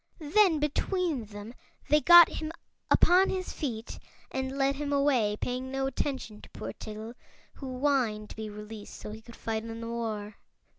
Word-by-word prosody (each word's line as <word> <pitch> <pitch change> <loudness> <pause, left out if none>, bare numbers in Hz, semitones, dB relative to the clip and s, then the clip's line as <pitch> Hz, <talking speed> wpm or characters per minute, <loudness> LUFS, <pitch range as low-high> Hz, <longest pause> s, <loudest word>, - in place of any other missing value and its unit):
Then 340 +2 +3
between 300 - -1
them 205 +2 -9 0.3
they 300 0 +4
got 345 +1 +10
him 315 0 -5 0.4
upon 370 +2 +5
his 370 -1 -3
feet 230 -6 -5 0.3
and 265 +1 -3
led 275 0 +2
him 290 0 -3
away, 265 -7 +2
paying 255 +1 -3
no 270 0 -1
attention 265 -5 -3
to - - -14
poor - - -7
Tiggle, 215 +2 -8 0.4
who 260 -2 -7
whined 250 -7 +1
to - - -9
be 220 -1 -5
released 210 0 -9
so 210 - -8
he 220 +1 -9
could 235 +1 -13
fight 220 -1 -3
in 225 0 -7
the 230 - -6
war. 215 -3 -4
255 Hz, 170 wpm, -29 LUFS, 220-290 Hz, 0.4 s, got